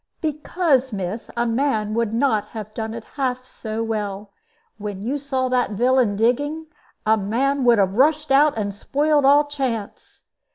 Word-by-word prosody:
"Because, 300 Hz, -3 st, 0 dB
miss, 195 Hz, +2 st, -4 dB
a 235 Hz, -, +1 dB
man 225 Hz, -3 st, 0 dB
would 230 Hz, -1 st, 0 dB
not 225 Hz, -3 st, +1 dB
have 215 Hz, -1 st, -6 dB
done 220 Hz, 0 st, -4 dB
it 230 Hz, -, -7 dB
half 255 Hz, -1 st, -3 dB
so 225 Hz, -3 st, -5 dB
well. 210 Hz, -2 st, -4 dB, 0.5 s
When 205 Hz, -1 st, -5 dB
you 270 Hz, +6 st, -2 dB
saw 265 Hz, -2 st, -1 dB
that 250 Hz, -4 st, +1 dB
villain 245 Hz, -1 st, +2 dB
digging, 290 Hz, +9 st, 0 dB, 0.4 s
a 220 Hz, +1 st, +4 dB
man 260 Hz, +7 st, 0 dB
would 240 Hz, -1 st, +6 dB
have 195 Hz, -2 st, +2 dB
rushed 300 Hz, +5 st, +2 dB
out 285 Hz, -1 st, +4 dB
and 205 Hz, -2 st, -2 dB
spoiled 290 Hz, +7 st, +1 dB
all 285 Hz, +2 st, +6 dB
chance. 260 Hz, -8 st, -5 dB
240 Hz, 160 wpm, -22 LUFS, 215-280 Hz, 0.5 s, would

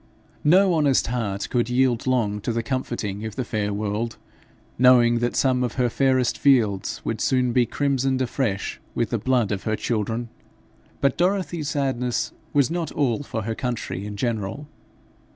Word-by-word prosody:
No 185 Hz, +4 st, +5 dB
honest 145 Hz, -5 st, +3 dB
heart 110 Hz, -5 st, -2 dB
could 120 Hz, -1 st, +1 dB
yield 125 Hz, -1 st, +1 dB
long 110 Hz, -5 st, +1 dB
to 120 Hz, -, -2 dB
the 115 Hz, 0 st, -1 dB
comforting 115 Hz, -5 st, -3 dB
of 110 Hz, -2 st, -5 dB
the 130 Hz, -, -2 dB
fair 105 Hz, -2 st, -2 dB
world, 105 Hz, +3 st, -2 dB, 0.6 s
knowing 120 Hz, -2 st, +6 dB
that 120 Hz, +1 st, -1 dB
some 130 Hz, -2 st, +2 dB
of 120 Hz, -, -2 dB
her 125 Hz, -1 st, +1 dB
fairest 130 Hz, 0 st, +1 dB
fields 110 Hz, -9 st, +2 dB
would 115 Hz, -, -2 dB
soon 125 Hz, -3 st, +2 dB
be 120 Hz, -1 st, +3 dB
crimsoned 135 Hz, -1 st, 0 dB
afresh 125 Hz, -5 st, -2 dB
with -, -, -1 dB
the -, -, 0 dB
blood 125 Hz, -5 st, +1 dB
of 100 Hz, -2 st, -2 dB
her 110 Hz, -, +1 dB
children. 115 Hz, +1 st, -2 dB, 0.7 s
But 140 Hz, -, +2 dB
Dorothy's 175 Hz, -4 st, 0 dB
sadness 130 Hz, -4 st, -1 dB, 0.2 s
was 140 Hz, 0 st, +2 dB
not 170 Hz, -1 st, -2 dB
all 135 Hz, -3 st, 0 dB
for 120 Hz, -6 st, -4 dB
her 115 Hz, +2 st, -2 dB
country 120 Hz, -5 st, -4 dB
in 105 Hz, -1 st, -7 dB
general. 115 Hz, +4 st, -2 dB
125 Hz, 165 wpm, -24 LUFS, 110-135 Hz, 0.7 s, knowing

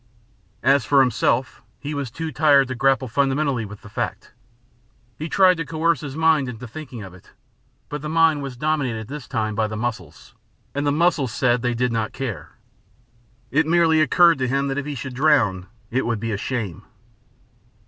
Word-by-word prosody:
As 135 Hz, 0 st, +4 dB
for 140 Hz, -, +3 dB
himself, 125 Hz, 0 st, 0 dB, 0.2 s
he 145 Hz, +3 st, -5 dB
was 140 Hz, -3 st, -3 dB
too 160 Hz, +7 st, -5 dB
tired 145 Hz, -4 st, +4 dB
to -, -, -2 dB
grapple 135 Hz, +1 st, +1 dB
fundamentally 135 Hz, -1 st, 0 dB
with 105 Hz, 0 st, -11 dB
the -, -, -11 dB
fact. -, -, -4 dB, 0.9 s
He 155 Hz, +2 st, -4 dB
tried 185 Hz, -1 st, +4 dB
to 165 Hz, -, -2 dB
coerce 165 Hz, -1 st, 0 dB
his 145 Hz, -2 st, -6 dB
mind 160 Hz, -4 st, +2 dB
into 125 Hz, +1 st, -8 dB
thinking 125 Hz, -3 st, -8 dB
of 95 Hz, -2 st, -10 dB
it, 95 Hz, -, -18 dB, 0.5 s
but 150 Hz, -1 st, -5 dB
the 150 Hz, -, -5 dB
mind 160 Hz, -2 st, +3 dB
was 135 Hz, -3 st, -6 dB
dominated 140 Hz, -6 st, -1 dB
at 110 Hz, -, -9 dB
this 145 Hz, -2 st, -7 dB
time 110 Hz, -5 st, -2 dB
by 110 Hz, +1 st, 0 dB
the 110 Hz, 0 st, -5 dB
muscles, 110 Hz, -9 st, -5 dB, 0.4 s
and 145 Hz, +1 st, -1 dB
the -, -, +3 dB
muscles 155 Hz, -5 st, +1 dB
said 120 Hz, 0 st, +1 dB
they 120 Hz, 0 st, -1 dB
did 125 Hz, +1 st, 0 dB
not 115 Hz, -1 st, -2 dB
care. 130 Hz, -7 st, -5 dB, 1.0 s
It 155 Hz, +4 st, +2 dB
merely 165 Hz, -1 st, +4 dB
occurred 165 Hz, +1 st, +5 dB
to 130 Hz, -, 0 dB
him 140 Hz, +2 st, 0 dB
that 135 Hz, +1 st, -1 dB
if 145 Hz, -, -5 dB
he 145 Hz, -, -4 dB
should 130 Hz, +1 st, -6 dB
drown 120 Hz, -10 st, +2 dB, 0.2 s
it 130 Hz, +1 st, 0 dB
would 115 Hz, -3 st, -1 dB
be 115 Hz, +1 st, -3 dB
a -, -, -1 dB
shame. 105 Hz, -6 st, -4 dB
135 Hz, 190 wpm, -22 LUFS, 115-150 Hz, 1.0 s, occurred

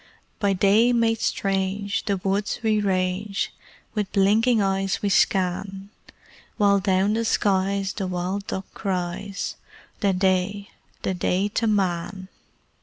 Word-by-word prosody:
By 200 Hz, -2 st, +2 dB
day 205 Hz, +6 st, +4 dB
made 225 Hz, -1 st, +2 dB
strange, 195 Hz, +1 st, -1 dB
the 200 Hz, -2 st, 0 dB
woods 195 Hz, +3 st, -1 dB
we 215 Hz, -1 st, +2 dB
range 190 Hz, +1 st, -1 dB, 0.4 s
With 210 Hz, -3 st, -2 dB
blinking 220 Hz, +4 st, +3 dB
eyes 195 Hz, -1 st, 0 dB
we 205 Hz, -, +2 dB
scan; 195 Hz, +1 st, 0 dB, 0.7 s
While 200 Hz, -2 st, +4 dB
down 195 Hz, +1 st, +2 dB
the 230 Hz, +1 st, 0 dB
skies 195 Hz, -2 st, +1 dB
the 195 Hz, -2 st, -3 dB
wild 185 Hz, +3 st, -3 dB
duck 190 Hz, -, -4 dB
cries 190 Hz, +1 st, -3 dB, 0.4 s
"The 200 Hz, -2 st, +2 dB
Day 190 Hz, +2 st, 0 dB, 0.3 s
the 190 Hz, -, 0 dB
Day 185 Hz, +2 st, 0 dB
to 225 Hz, +2 st, 0 dB
Man!" 190 Hz, -2 st, -1 dB
195 Hz, 125 wpm, -24 LUFS, 190-205 Hz, 0.7 s, day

